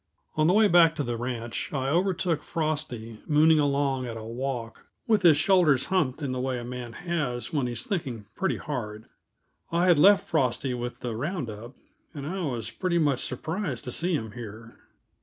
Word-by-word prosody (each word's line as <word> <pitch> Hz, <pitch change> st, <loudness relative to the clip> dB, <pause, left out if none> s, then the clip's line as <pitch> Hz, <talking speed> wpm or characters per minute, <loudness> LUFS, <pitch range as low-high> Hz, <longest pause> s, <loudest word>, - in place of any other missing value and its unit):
On 155 Hz, 0 st, +3 dB
the 180 Hz, -, +4 dB
way 215 Hz, +1 st, +6 dB
back 170 Hz, -3 st, +5 dB
to 145 Hz, -, -1 dB
the 120 Hz, -2 st, -2 dB
ranch 120 Hz, -1 st, -4 dB
I 135 Hz, -2 st, -1 dB
overtook 175 Hz, -1 st, +1 dB
Frosty 145 Hz, -9 st, -3 dB
mooning 155 Hz, 0 st, +5 dB
along 140 Hz, -3 st, +1 dB
at 115 Hz, -1 st, -5 dB
a 110 Hz, -, -7 dB
walk, 115 Hz, 0 st, -5 dB, 0.2 s
with 215 Hz, -3 st, +3 dB
his 165 Hz, -5 st, +6 dB
shoulders 155 Hz, -5 st, +4 dB
humped 155 Hz, -5 st, +1 dB
in 135 Hz, -, -1 dB
the 130 Hz, -, -2 dB
way 130 Hz, 0 st, -1 dB
a 120 Hz, -, -5 dB
man 120 Hz, -1 st, -6 dB
has 145 Hz, -7 st, -3 dB
when 140 Hz, -5 st, +1 dB
he's 120 Hz, -, -3 dB
thinking 140 Hz, -, -3 dB
pretty 190 Hz, -, -1 dB
hard. 110 Hz, -7 st, -5 dB, 0.7 s
I 170 Hz, +2 st, +2 dB
had 175 Hz, -4 st, +5 dB
left 200 Hz, +5 st, +6 dB
Frosty 130 Hz, 0 st, 0 dB
with 120 Hz, 0 st, -5 dB
the 120 Hz, -3 st, -3 dB
round 145 Hz, -, -3 dB
up, 115 Hz, +5 st, -10 dB, 0.4 s
and 140 Hz, -1 st, -6 dB
I 185 Hz, +5 st, -3 dB
was 120 Hz, -6 st, -3 dB
pretty 170 Hz, +8 st, -1 dB
much 145 Hz, -6 st, +2 dB
surprised 155 Hz, -, -3 dB
to 125 Hz, -, -5 dB
see 175 Hz, +6 st, +1 dB
him 110 Hz, -6 st, -3 dB
here. 115 Hz, 0 st, -9 dB
135 Hz, 190 wpm, -27 LUFS, 120-165 Hz, 0.7 s, way